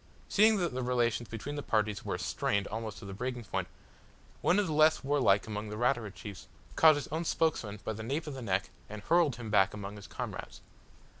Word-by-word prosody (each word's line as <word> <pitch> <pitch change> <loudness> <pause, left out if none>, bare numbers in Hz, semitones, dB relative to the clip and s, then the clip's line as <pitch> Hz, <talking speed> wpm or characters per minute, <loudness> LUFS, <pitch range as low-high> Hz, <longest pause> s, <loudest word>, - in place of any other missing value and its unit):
Seeing 215 +1 +5
that 175 -7 -1
the 130 - -2
relations 120 -2 0
between 115 +6 -5
the - - -2
parties 105 -5 0
were - - -2
"strained" 100 -1 0
almost 110 -1 -5
to - - -10
the 100 - -6
breaking 125 +3 -4
point, 100 - -3 0.7
one 180 - +3
of 205 - +3
the 160 - -2
less 155 0 +4
warlike 135 -8 +3
among 105 -1 -5
the 105 - -5
Ratura 120 -2 +1
chiefs 100 -1 -9 0.3
caught 160 -1 +7
his 145 - -4
own 160 +3 -2
spokesman 120 -11 0
by 110 - -1
the 110 - -7
nape 140 +8 -2
of 150 - -5
the 135 - -7
neck, 95 -4 -1 0.2
and 105 0 -7
hurled 165 -6 +3
him 115 -3 -7
back 95 -1 +4
among 100 0 -6
his 100 -3 -10
comrades. - - -6
115 Hz, 215 wpm, -31 LUFS, 105-145 Hz, 0.7 s, caught